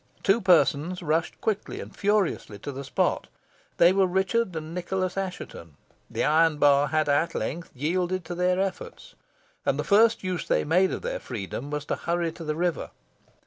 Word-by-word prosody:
Two 200 +4 +3
persons 180 -1 +3
rushed 160 +1 -1
quickly 215 -2 -2
and - - -9
furiously 200 - 0
to 145 - -6
the 140 +1 -6
spot. 130 - 0 0.5
They 170 +2 +6
were 195 -1 +3
Richard 190 +2 0
and 160 +1 -5
Nicholas 185 +1 -2
Assheton. 180 - -6 0.3
The - - -2
iron 160 0 +3
bar 145 0 +4
had 155 0 +1
at 145 +3 +1
length 165 +10 -3
yielded 175 +5 -1
to 175 - -5
their 180 +1 +1
efforts, 195 -1 -4 0.5
and - - +1
the - - -1
first 225 +2 +4
use 185 -2 -3
they - - +2
made 180 +5 +3
of - - -5
their - - -3
freedom 115 +6 -6
was 150 0 -4
to - - -1
hurry 170 -1 -1
to 165 - -10
the 155 -1 -2
river. 175 +1 -1
175 Hz, 180 wpm, -26 LUFS, 155-190 Hz, 0.5 s, They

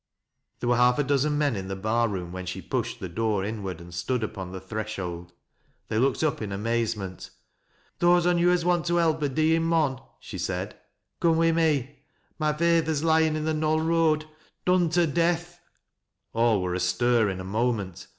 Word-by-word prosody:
There 120 - -1
were 120 - +3
half 125 0 +4
a 145 - +2
dozen 145 +1 +1
men 145 -5 +1
in 95 -1 -5
the 95 - -4
bar 110 +4 +1
room 90 -5 -4
when 95 0 -6
she 90 - -4
pushed - - -3
the 95 - -5
door 105 +2 -1
inward 100 -5 -5
and 85 0 -12
stood 115 +8 -1
upon 95 -4 -5
the 95 - -6
threshold. 95 -4 -5 0.6
They 110 - 0
looked 135 +4 +1
up 155 -6 0
in 105 -2 -4
amazement. 105 -2 -2 0.4
" - - -38
Those 175 0 +4
on 175 -1 +3
yo' 175 +1 +4
as 180 -1 +2
want 175 -2 +1
to 175 - +1
help 160 -2 +2
a 145 - +1
deeing 155 +4 +2
mon," 155 -6 +1 0.2
she - - -8
said, - - -3 0.5
"couje 165 -1 +4
wi' 165 0 +4
me. 145 -4 0 0.4
My 155 -1 +2
feyther's 160 -1 +1
lyin' 160 -1 +3
in 155 0 -2
the 160 - 0
KjioU 155 +1 +1
Koad, 160 -2 +2 0.4
done 180 -2 +3
to 175 +1 +3
death." 175 +2 -1 0.7
All 115 -4 +2
were 90 -1 -2
astir 110 +5 +2
in 95 -1 -4
a - - -5
moment. 100 -2 -2
130 Hz, 190 wpm, -26 LUFS, 100-160 Hz, 0.7 s, half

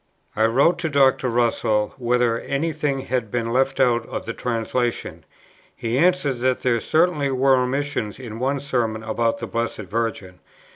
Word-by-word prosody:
I 110 - +3
wrote 140 +10 +3
to 165 - -1
ask 155 - -7
Dr. 130 -2 +4
Russell 115 -3 +1
whether 120 -2 +1
any 155 +4 -2
thing 145 -3 -1
had 125 -4 -2
been 115 +1 -2
left 135 +1 +1
out 120 -3 +3
in - - -4
the 115 - -5
translation; 120 0 -2 0.5
he 115 +1 -3
answered 170 -7 +2
that 130 +1 +1
there 120 -2 +1
certainly 155 -3 +2
were 135 0 +3
omissions 130 -4 -1
in 115 -3 -8
one 135 +3 0
Sermon 115 -5 -1
about 115 +1 0
the - - -5
Blessed 115 -1 -3
Virgin. 100 -3 -3
125 Hz, 165 wpm, -22 LUFS, 115-135 Hz, 0.5 s, Dr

